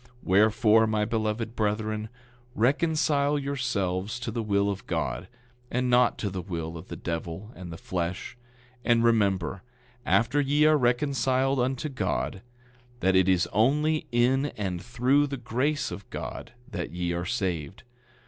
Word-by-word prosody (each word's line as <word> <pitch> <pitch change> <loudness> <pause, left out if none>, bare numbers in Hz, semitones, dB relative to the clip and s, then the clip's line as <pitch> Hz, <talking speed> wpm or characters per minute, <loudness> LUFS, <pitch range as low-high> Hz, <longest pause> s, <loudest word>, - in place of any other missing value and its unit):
10:24 - - -23 0.2
Wherefore, 110 +3 +4
my 105 -1 +1
beloved 110 +1 -2
brethren, 110 0 -1 0.5
reconcile 145 +2 +2
yourselves 120 -7 -2
to 115 - -3
the 115 +1 -2
will 100 -2 +1
of 100 0 -7
God, 90 - -2 0.4
and 125 +1 0
not 125 0 +4
to 100 - -3
the 95 0 -4
will 85 -2 -5
of 80 +2 -9
the - - -6
devil 85 +5 -5
and 90 -2 -8
the 85 - -7
flesh; 90 0 -4 0.5
and 115 -1 +3
remember, 100 -5 +2 0.4
after 125 +5 +2
ye 145 +2 +3
are 155 0 +6
reconciled 130 0 +1
unto 130 +3 0
God, 130 -7 -2 0.6
that 95 0 +3
it 95 0 +4
is 90 -2 +3
only 150 +9 +2
in 130 +4 +3
and 95 -4 -3
through 130 +6 +2
the 140 0 -4
grace 130 +5 -1
of 100 - -8
God - - -6
that 90 -10 -4
ye 85 0 -2
are 85 0 -2
saved. 90 -10 -3
115 Hz, 150 wpm, -27 LUFS, 95-130 Hz, 0.6 s, are